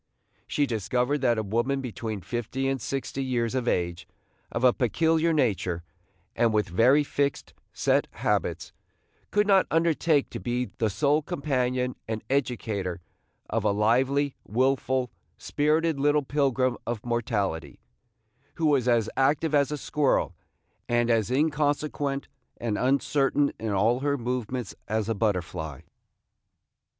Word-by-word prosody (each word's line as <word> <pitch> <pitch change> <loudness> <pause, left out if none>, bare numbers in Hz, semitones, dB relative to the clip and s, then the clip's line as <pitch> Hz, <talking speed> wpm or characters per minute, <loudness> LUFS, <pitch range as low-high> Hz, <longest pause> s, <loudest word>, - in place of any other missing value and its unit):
She 145 - +1
discovered 125 +4 0
that 120 -3 +3
a 110 - 0
woman 120 +7 0
between 115 -5 -5
fifty 120 +6 -3
and 135 -2 -1
sixty 135 +1 -3
years 120 -3 -1
of 130 -2 -1
age, 85 -2 -1 0.4
of 115 - -3
a 125 -1 +6
peculiar 160 +6 +2
nature, 100 - 0 0.5
and 115 -1 +3
with 105 -3 +1
very 125 +11 +4
fixed, 140 0 -2 0.2
set - - +1
habits, - - -2 0.6
could 210 0 +2
not 195 -2 +4
undertake 165 -2 +2
to - - -5
be 125 +1 -2
the 110 - +2
sole 140 +9 +2
companion 125 -3 -1
and 110 -1 -3
educator 110 -9 -1 0.5
of 115 -1 -1
a 105 - +3
lively, 130 +7 +2
wilful, 130 +1 0 0.3
spirited 155 +1 +1
little 145 +1 +3
pilgrim 130 -3 +1
of 120 -2 -3
mortality, 100 - -2 0.8
who 165 - -1
was 140 -5 +3
as 115 -3 +3
active 145 +3 +2
as 145 0 +3
a 150 - -2
squirrel, 145 -1 +1 0.6
and 120 0 +2
as 110 -2 +2
inconsequent 145 0 0 0.3
and 115 -3 -2
uncertain 140 +2 +2
in 110 - -3
all 110 +5 +2
her 140 +1 0
movements 125 -2 -3
as 110 -1 -1
a 115 - +1
butterfly. 90 - -2
125 Hz, 135 wpm, -27 LUFS, 110-140 Hz, 0.8 s, a